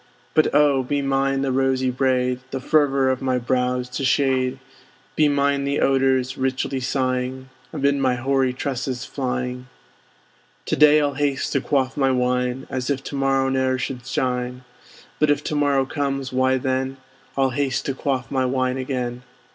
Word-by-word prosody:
But 155 - +4
oh! 145 -2 +4
be 140 +2 -1
mine 135 0 +1
the 135 - 0
rosy 130 -1 +1
braid, 125 -1 +1
The 135 - -4
fervor 135 -2 +2
of 130 - -3
my 130 -1 +1
brows 125 0 0
to 125 +2 -4
shade; 130 -1 +1 0.6
Be 150 -1 +4
mine 140 0 +1
the 140 +1 0
odors, 135 0 +2
richly 130 0 -1
sighing, 130 0 -2 0.2
Amid 140 -2 +1
my 130 -2 +1
hoary 130 +1 +1
tresses 130 -1 -3
flying. 125 -1 -3 1.0
To - - 0
day 150 0 +6
I'll 145 -1 0
haste 140 -1 -1
to 140 - +1
quaff 135 -2 0
my 135 -2 +3
wine, 125 0 0
As 130 0 -3
if 135 -1 -1
to - - -6
morrow 135 -1 +1
ne'er 130 -1 +1
should 125 0 -5
shine; 125 -1 -2 0.6
But 150 - +3
if 145 - +2
to 150 - -3
morrow 140 -2 +2
comes, 135 -2 -3
why 130 0 +2
then 130 +1 -2 0.4
I'll 135 -1 +2
haste 135 +1 -1
to 135 - -1
quaff 130 -2 -2
my 130 -1 +1
wine 130 0 0
again. 125 -2 -3
130 Hz, 165 wpm, -22 LUFS, 130-140 Hz, 1.0 s, day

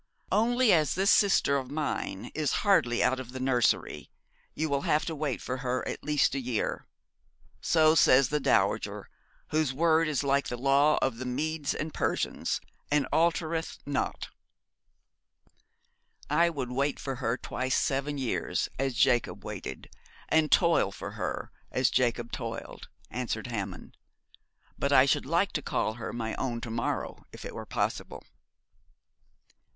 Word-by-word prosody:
'Only 240 +2 +4
as 155 -4 +2
this 195 +3 +3
sister 195 -8 +4
of 130 -2 -4
mine 145 -9 -3
is 155 -2 0
hardly 125 -12 +3
out 130 +1 +2
of 125 -1 -8
the 130 - -5
nursery 130 -3 +1 0.5
you 160 - -1
will 140 -2 0
have 150 +2 +1
to 165 - -3
wait 150 -4 -3
for 130 - -3
her 125 -1 -2
at - - -5
least 150 -2 +2
a 135 - -1
year. 125 -3 -2 0.7
So 155 -1 +4
says 135 -5 +5
the 150 - 0
dowager, - - 0 0.4
whose 155 -4 +1
word 165 +1 +3
is 145 -3 0
like 140 0 +1
the 120 - -4
law 140 +4 +3
of 130 -4 0
the 130 - -4
Medes 150 +3 -2
and 155 +1 -4
Persians, - - -1 0.3
and 145 -1 +2
altereth 165 0 0
not.' 140 -1 -2 2.0
'I 170 0 +4
would 135 -6 -4
wait 140 +3 0
for 135 -2 -4
her 120 -1 -1
twice 130 0 -2
seven 140 +1 -1
years, 130 -4 -1
as 135 -2 -1
Jacob 120 +2 +2
waited, - - -6 0.4
and 160 -1 +3
toil 170 - +4
for - - -7
her, - - -4 0.2
as 130 -2 +2
Jacob 120 -1 0
toiled,' - - -6 0.2
answered 115 -2 -3
Hammond, 100 -6 -5 0.8
'but - - 0
I - - +7
should - - +1
like - - +2
to - - -2
call 110 - -1
her 115 +1 -6
my 110 -2 -3
own 120 -3 -2
to 115 - -5
morrow, 115 - -3
if - - -10
it - - -6
were - - -7
possible.' - - -3
135 Hz, 155 wpm, -29 LUFS, 125-155 Hz, 2.0 s, I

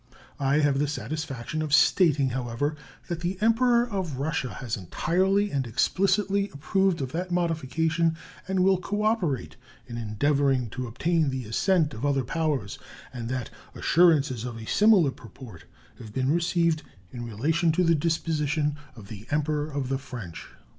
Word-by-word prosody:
I 140 +2 +2
have 140 -2 +2
the 145 - +1
satisfaction 150 +1 -4
of 150 -1 +3
stating, 150 -8 +4
however, 125 +4 -2 0.3
that 170 -2 -3
the 175 +2 -2
Emperor 235 +2 +3
of 190 - -3
Russia 140 -2 -2
has 120 -4 -3
entirely 190 - 0
and 135 -3 -1
explicitly 195 - +1
approved 170 +4 0
of 130 -2 -3
that 180 +2 -3
modification 165 -1 0 0.3
and 190 -1 +1
will 190 0 +4
cooperate 205 - -1 0.3
in 120 -2 -7
endeavoring 130 +2 +1
to 125 0 -4
obtain 160 +6 +1
the 130 -2 -4
assent 155 - +1
of 110 - -7
other 140 -2 +1
powers, 140 - -2 0.3
and 120 -2 -5
that 130 -2 -3 0.2
assurances 150 -8 +3
of 120 -2 -5
a 110 - -8
similar 200 - +4
purport 115 -7 -13 0.3
have 110 -3 -10
been 130 +4 0
received 170 -1 +1 0.3
in 120 - -6
relation 155 +10 +1
to 180 - +2
the 165 -1 +4
disposition 150 -2 0 0.2
of 105 -4 -12
the 105 +1 -10
Emperor 150 0 0
of 140 -3 -3
the 135 0 -1
French. 120 - -8
150 Hz, 155 wpm, -26 LUFS, 130-175 Hz, 0.3 s, stating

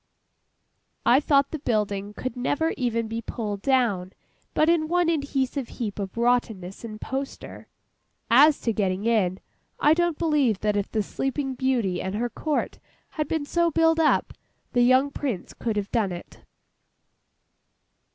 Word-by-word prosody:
I 250 +3 +6
thought 280 -2 +2
the 315 - -4
building 210 -5 -1
could 255 0 -4
never 290 +6 0
even 230 -3 -1
be 225 +1 -4
pulled 210 -3 -4
down, 220 -9 +1 0.4
but 310 - +3
in 330 -2 +3
one 350 0 +2
adhesive 280 -4 -1
heap 215 -4 -4
of 195 +2 -5
rottenness 230 -6 0
and 215 -2 -7
poster. 270 +3 -6 0.6
As 290 +5 +6
to 230 - 0
getting 195 -1 -1
in—I 220 - 0
don't 345 -1 +1
believe 290 - +1
that 210 -1 +1
if 205 -1 -2
the 215 -2 0
Sleeping 270 +4 -2
Beauty 240 -8 0
and 190 +1 -3
her 240 +2 -2
Court 305 -2 -2 0.3
had 305 -2 -3
been 315 -2 -1
so 340 +3 +2
billed 325 0 +3
up, 315 - +2 0.4
the 245 - +3
young 255 +3 +4
Prince 260 -10 -4
could 225 -3 -3
have 205 -1 -3
done 220 -6 +1
it. 175 0 -9
245 Hz, 150 wpm, -25 LUFS, 210-290 Hz, 0.6 s, I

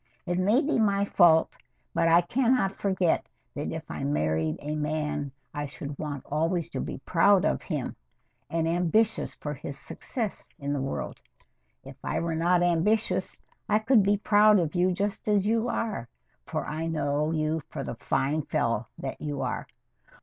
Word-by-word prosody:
It 175 +1 -1
may 210 +8 +4
be 295 -4 +1
my 200 -2 +3
fault, 170 -5 +4 0.4
but 165 - +2
I 165 +1 +6
can 245 +8 +2
not 195 -6 +1
forget 190 -4 0 0.3
that - - -4
if - - -4
I - - -5
married 80 +2 0
a 150 +1 -4
man 150 -2 -2 0.2
I 145 0 -3
should 140 0 -7
want 145 -3 -4
always 165 +3 -1
to - - -3
be - - -4
proud 190 +2 +4
of - - +1
him, - - -3 0.5
and 165 -1 0
ambitious 180 +6 +1
for 150 - -5
his 140 0 -7
success 215 - -4
in 140 -2 -3
the 140 - -1
world. 135 - -4 0.6
If - - -11
I - - -1
were 170 -1 -1
not 175 +2 +3
ambitious, 175 +6 +1 0.3
I 210 - +5
could 220 +1 +4
be 200 +1 +3
proud 210 +1 +5
of 165 -5 0
you 180 +1 +3
just 200 +4 -2
as 205 -2 +3
you 225 +2 +1
are, 210 - -2 0.4
for - - -2
I 160 +2 -3
know 150 -1 0
you 155 0 0
for - - -5
the - - -4
fine 150 +4 0
fellow 115 -5 -1
that 135 - -6
you 145 -2 -3
are. - - -3
165 Hz, 175 wpm, -27 LUFS, 150-200 Hz, 0.6 s, I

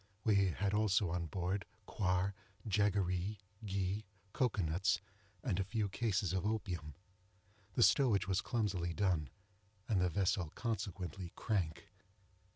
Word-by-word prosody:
We 100 -3 +4
had 100 +3 -1
also 105 -3 +3
on 85 -1 -1
board 95 +3 -1 0.2
coir, 95 -1 +1 0.3
jaggeree, 100 -1 +1 0.3
ghee, 100 +1 -1 0.3
cocoa 115 -7 +1
nuts, 90 +5 +2 0.4
and 100 -7 0
a - - +2
few 105 +1 -1
cases 100 -3 0
of 95 - 0
opium. 90 -9 -2 0.8
The 120 - +5
stowage 115 -10 +4
was 95 +1 +2
clumsily 100 -8 -1
done, 90 -8 +1 0.6
and 100 -5 +2
the 90 - +3
vessel 95 -2 +1
consequently 95 -6 -3
crank. 85 -7 -1
95 Hz, 125 wpm, -36 LUFS, 90-105 Hz, 0.8 s, The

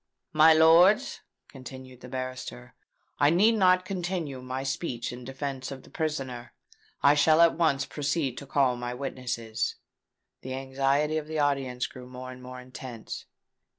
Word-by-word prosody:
"My 155 +1 +7
lords," 170 +9 +5 0.3
continued 130 -1 -11
the 125 - -10
barrister, 130 -1 -6 0.5
"I 145 0 +5
need 190 +8 +5
not 185 -4 +4
continue 175 -8 -3
my 130 +1 -4
speech 130 -3 -3
in 125 0 -9
defence 135 0 -5
of 135 -2 -8
the - - -17
prisoner. 135 -6 -4 0.5
I 140 - +7
shall 155 +2 +4
at 170 -1 +6
once 140 -5 +2
proceed 145 -3 -1
to 140 - -11
call 130 -2 +2
my 120 0 -4
witnesses." 120 -4 -3 0.7
The 130 0 -5
anxiety 135 +3 0
of 150 - -9
the 160 0 -4
audience 135 -4 0
grew 125 -1 -10
more 130 0 -8
and 125 0 -11
more 125 0 -9
intense. 125 -2 -8
135 Hz, 150 wpm, -28 LUFS, 125-155 Hz, 0.7 s, My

